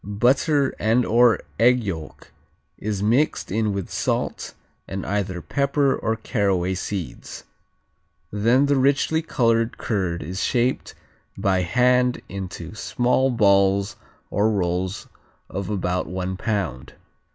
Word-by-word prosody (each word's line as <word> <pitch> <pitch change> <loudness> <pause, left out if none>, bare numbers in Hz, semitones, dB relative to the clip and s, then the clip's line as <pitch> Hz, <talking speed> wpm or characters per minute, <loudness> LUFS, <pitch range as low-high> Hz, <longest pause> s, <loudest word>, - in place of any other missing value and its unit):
Butter 130 - +2
and/or 115 +1 +3 0.2
egg 125 +1 +4
yolk 80 -6 -7 0.5
is 105 -1 -3
mixed 120 +4 +1
in 110 +1 0
with 100 -2 -4
salt, - - -2 0.3
and 95 0 -5
either 95 -4 -2
pepper 140 - +1
or 110 - -1
caraway 100 -5 0
seeds. 95 -1 -6 0.9
Then 115 +7 +3
the 140 -1 +2
richly 140 +4 +2
colored 115 -7 +1
curd 90 -6 -2
is 90 +5 -4
shaped 125 +1 0 0.4
by 95 -1 +1
hand 125 +6 +2
into 90 -3 -7
small 125 +4 +1
balls 100 -4 +3 0.4
or 105 +2 +2
rolls 95 -1 -2 0.4
of 95 0 -4
about 90 -3 -1
one 95 +1 -3
pound. 95 - -3
105 Hz, 115 wpm, -23 LUFS, 95-125 Hz, 0.9 s, egg